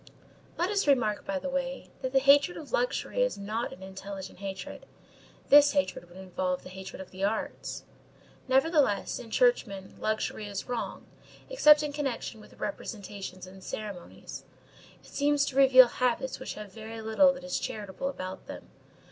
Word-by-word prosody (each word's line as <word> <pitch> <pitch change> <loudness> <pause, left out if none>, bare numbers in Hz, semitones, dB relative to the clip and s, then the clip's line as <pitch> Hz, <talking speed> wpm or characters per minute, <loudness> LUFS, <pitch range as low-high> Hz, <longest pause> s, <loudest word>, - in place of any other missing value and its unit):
'" - - -28
Let 355 +4 +1
us 405 -6 +1
remark, 245 -6 +2
by 295 -1 -1
the 280 0 -4
way, 270 -1 -3
that 260 - -2
the 270 - +3
hatred 280 +5 +5
of 310 - -9
luxury - - 0
is - - +1
not 215 +4 -3
an 185 - -11
intelligent 190 0 -8
hatred. 190 -2 -7 0.6
This 290 0 +8
hatred 280 -11 -1
would 175 - -14
involve 185 -1 -2
the - - -10
hatred 190 +1 -9
of 190 - -9
the 190 +1 -6
arts. 210 +2 -2 0.6
Nevertheless, 270 - +2
in 235 - -9
churchmen, 215 - +1
luxury 215 -1 -2
is 200 -1 -5
wrong, 245 -2 -4 0.5
except 300 -11 +7
in 295 -1 -3
connection 265 -6 -3
with - - -17
representations 200 -3 -6
and 190 +1 -13
ceremonies. 205 -5 -7 0.6
It - - -16
seems 290 0 +2
to 265 - -5
reveal 260 -2 +8
habits 250 +1 -1
which - - -6
have 210 -2 -9
very 225 0 -8
little 220 +6 +4
that 270 0 -10
is 270 0 -2
charitable 210 +5 -4
about 185 -8 -7
them. - - -9
230 Hz, 165 wpm, -29 LUFS, 195-280 Hz, 0.6 s, This